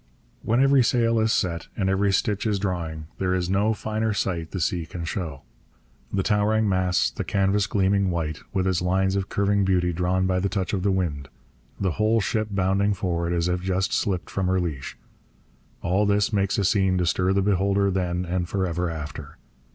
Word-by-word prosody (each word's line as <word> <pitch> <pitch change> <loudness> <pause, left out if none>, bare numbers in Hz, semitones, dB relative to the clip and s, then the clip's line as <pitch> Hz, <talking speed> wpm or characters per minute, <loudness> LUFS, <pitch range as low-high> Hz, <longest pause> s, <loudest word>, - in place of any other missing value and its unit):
When 120 +4 +2
every 135 -1 +5
sail 115 -1 +2
is 110 0 +2
set 85 -6 -1
and 95 - 0
every 95 +1 +2
stitch 105 +3 0
is 105 -2 +1
drawing, 85 -5 -3
there 95 -1 +1
is 90 0 -1
no 105 +3 +2
finer 110 0 -2
sight 85 -5 -2
the 95 - -4
sea 85 0 -1
can 85 -2 -6
show. 80 -5 -4 0.7
The 95 - 0
towering 105 +2 +2
masts; 95 -2 +1
the - - -4
canvas 100 +1 +1
gleaming 100 -1 +2
white, 80 -3 -2
with 95 -2 0
its 95 -2 +1
lines 95 +2 +1
of 100 0 -2
curving 100 0 +1
beauty 90 -2 +1
drawn 90 +2 0
by 95 0 +1
the 100 +2 0
touch 95 -1 -2
of 95 - 0
the 100 - +1
wind; 80 -8 -1 0.5
the 95 -2 0
whole 110 +1 +3
ship 110 +1 -1
bounding 100 +1 +1
forward 85 -3 -1
as 85 0 0
if 90 0 -1
just 95 0 -1
slipped 95 -3 -1
from 95 -2 -1
her 95 0 +2
leash 75 -7 -4 0.9
all 95 +4 +2
this 100 +1 +2
makes 100 -1 +1
a 100 - +1
scene 95 -1 +2
to 90 - +1
stir 90 +2 +1
the 95 0 +2
beholder 100 0 +2
then 90 -1 -1
and 90 0 -2
for 95 -2 0
ever 90 0 -1
after. 75 -2 -7
95 Hz, 200 wpm, -24 LUFS, 90-100 Hz, 0.9 s, every